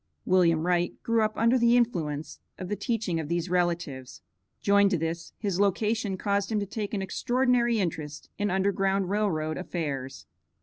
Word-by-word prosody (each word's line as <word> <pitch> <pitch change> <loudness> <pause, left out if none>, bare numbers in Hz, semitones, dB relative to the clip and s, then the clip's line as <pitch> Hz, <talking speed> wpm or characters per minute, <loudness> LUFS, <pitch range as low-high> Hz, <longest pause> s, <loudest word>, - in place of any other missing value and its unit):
William 170 -3 +3
Wright 175 -1 +1
grew 230 -1 +2
up 215 0 +1
under 235 +3 +3
the 235 +1 +5
influence 160 -11 -1 0.2
of 185 - -6
the 210 - -1
teachings 205 -6 -1
of 150 - -7
these 170 +1 -1
relatives. 170 -7 -2 0.4
Joined 200 0 +4
to 185 - +1
this, 165 +1 -4
his 195 -4 -2
location 205 0 +1
caused 200 +2 -1
him 215 - +1
to 200 - -2
take 210 +1 -4
an 195 - -2
extraordinary 245 +2 +1
interest 155 -5 -4
in 205 0 +1
Underground 195 0 +1
Rail 210 0 +2
Road 155 -1 -2
affairs. 140 -7 -4
190 Hz, 170 wpm, -27 LUFS, 170-210 Hz, 0.4 s, the